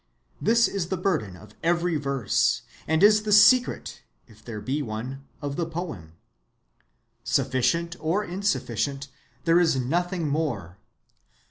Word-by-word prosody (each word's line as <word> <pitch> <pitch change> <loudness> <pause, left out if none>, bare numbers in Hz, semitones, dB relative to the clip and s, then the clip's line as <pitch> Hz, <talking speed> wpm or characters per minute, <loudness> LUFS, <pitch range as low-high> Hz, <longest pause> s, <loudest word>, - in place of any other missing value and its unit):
This 235 +1 +4
is 190 -4 -3
the 190 - -2
burden 155 - -1
of - - -15
every 170 0 +1
verse, 140 -7 0 0.2
and 160 +3 +2
is 210 +1 +6
the 215 0 -3
secret, 240 +5 +4 0.2
if 110 -2 -20
there 110 -2 -6
be 130 +8 -2
one, 130 +3 -6 0.2
of 140 -1 -3
the 170 - -1
poem. 155 - -6 1.1
Sufficient 140 +6 0
or 170 +7 0
insufficient, 140 - -2 0.4
there 170 +1 +5
is 165 -5 +3
nothing 170 +6 -1
more.... 120 - -3
155 Hz, 130 wpm, -25 LUFS, 125-180 Hz, 1.1 s, is